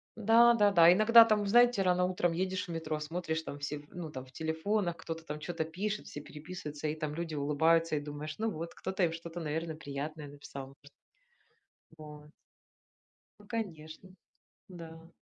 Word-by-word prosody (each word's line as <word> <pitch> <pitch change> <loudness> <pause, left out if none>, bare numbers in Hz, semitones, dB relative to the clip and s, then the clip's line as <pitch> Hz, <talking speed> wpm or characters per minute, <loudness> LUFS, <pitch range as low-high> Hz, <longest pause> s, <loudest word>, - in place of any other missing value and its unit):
Да-да-да. 220 -6 +6
Иногда 225 +4 +8
там, 215 -2 +1
знаете, 240 +1 +5
рано 180 -1 +2
утром 180 -1 0
едешь 185 +1 -2
в - - -6
метро, 160 -2 -3
смотришь, 160 +1 -3
там 145 - -7
все, 145 +1 -4
ну 175 -3 -6
там 130 -3 -8
в 130 - -19
телефонах, 170 +5 -1
кто-то 165 0 -7
там 150 0 -5
чё-то 165 +1 -3
пишет, 200 +6 -4
все 145 - -7
переписываются, 150 0 -7
и 150 - -2
там 155 -1 -4
люди 165 0 -4
улыбаются, 160 +3 +2
и - - 0
думаешь: 145 +1 -6
"Ну 225 +1 0
вот, 165 -4 -6
кто-то 190 0 -3
им 165 -2 +2
что-то, 165 +1 -7
наверно, 160 0 -3
приятное 150 0 -6
написал, 140 -1 -9
может". 140 +1 -18 1.1
Вот. 150 -1 -12 1.1
Ну, 205 - -16
конечно. 185 -5 -6 0.6
Да. 165 -2 -11
165 Hz, 160 wpm, -31 LUFS, 150-185 Hz, 1.1 s, Иногда